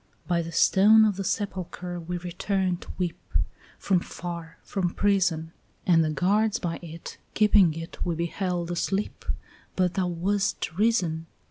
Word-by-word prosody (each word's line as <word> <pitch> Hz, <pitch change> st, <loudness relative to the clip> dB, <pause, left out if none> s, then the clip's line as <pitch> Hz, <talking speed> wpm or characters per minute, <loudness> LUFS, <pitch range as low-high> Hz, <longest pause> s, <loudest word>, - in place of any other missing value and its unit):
By 175 Hz, -1 st, +2 dB
the 165 Hz, 0 st, -6 dB
stone 210 Hz, +6 st, +6 dB
of 210 Hz, -2 st, +2 dB
the 195 Hz, -, -2 dB
sepulchre 180 Hz, -3 st, -3 dB
we 175 Hz, +1 st, -4 dB
returned 180 Hz, +1 st, -1 dB
to -, -, -8 dB
weep, 175 Hz, -2 st, -2 dB, 0.6 s
From 190 Hz, -3 st, +2 dB
far, 170 Hz, -1 st, -7 dB
from 180 Hz, -3 st, -2 dB
prison; 180 Hz, -5 st, +1 dB, 0.3 s
And 165 Hz, -3 st, +5 dB
the 155 Hz, -, 0 dB
guards 205 Hz, +8 st, +2 dB
by 170 Hz, -5 st, -3 dB
it 165 Hz, -1 st, -9 dB, 0.2 s
keeping 205 Hz, -6 st, +5 dB
it 165 Hz, 0 st, -6 dB
we 170 Hz, -2 st, -1 dB
beheld 175 Hz, +1 st, -2 dB
asleep, 195 Hz, +4 st, -2 dB, 0.5 s
But 180 Hz, -1 st, +2 dB
thou 185 Hz, -2 st, 0 dB
wast 180 Hz, 0 st, -1 dB
risen. 180 Hz, -7 st, +1 dB
180 Hz, 145 wpm, -26 LUFS, 170-195 Hz, 0.6 s, stone